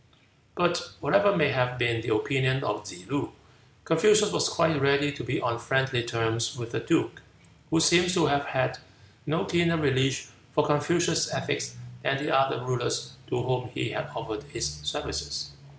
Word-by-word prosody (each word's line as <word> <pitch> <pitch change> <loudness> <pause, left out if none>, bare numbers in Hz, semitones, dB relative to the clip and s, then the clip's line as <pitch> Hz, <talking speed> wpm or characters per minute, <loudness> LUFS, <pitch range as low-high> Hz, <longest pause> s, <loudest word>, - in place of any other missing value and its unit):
'" - - -35
But 175 0 0
whatever 200 0 +3
may 150 -2 +4
have 125 -1 0
been 120 -2 +1
the 115 - 0
opinion 130 +3 +1
of 105 -6 -2
Tsze 90 -2 -10
loo, 140 +1 -3 0.5
Confucius 210 +5 +4
was - - +1
quite 160 -4 +2
ready 140 +1 +3
to 145 - -7
be 125 +2 -1
on 115 0 -1
friendly 135 +1 +1
terms 115 -1 -1
with 115 -1 -6
the - - -1
duke, - - 0 0.5
who 160 - +3
seems 175 +3 +4
to 170 -4 +4
have 140 -1 +1
had 130 -2 -1 0.5
no 160 +3 0
keener 170 -1 +2
relish 135 -3 +1 0.3
for 150 - +3
Confucius' 150 +3 +1
ethics - - -2 0.3
than 135 - +1
the 150 +2 0
other 135 -2 +2
rulers 125 0 -2
to 120 - -1
whom 125 0 -1
he - - -1
had - - -4
offered - - -5
his 70 - -3
services. 70 -1 -4
135 Hz, 170 wpm, -27 LUFS, 120-160 Hz, 0.5 s, may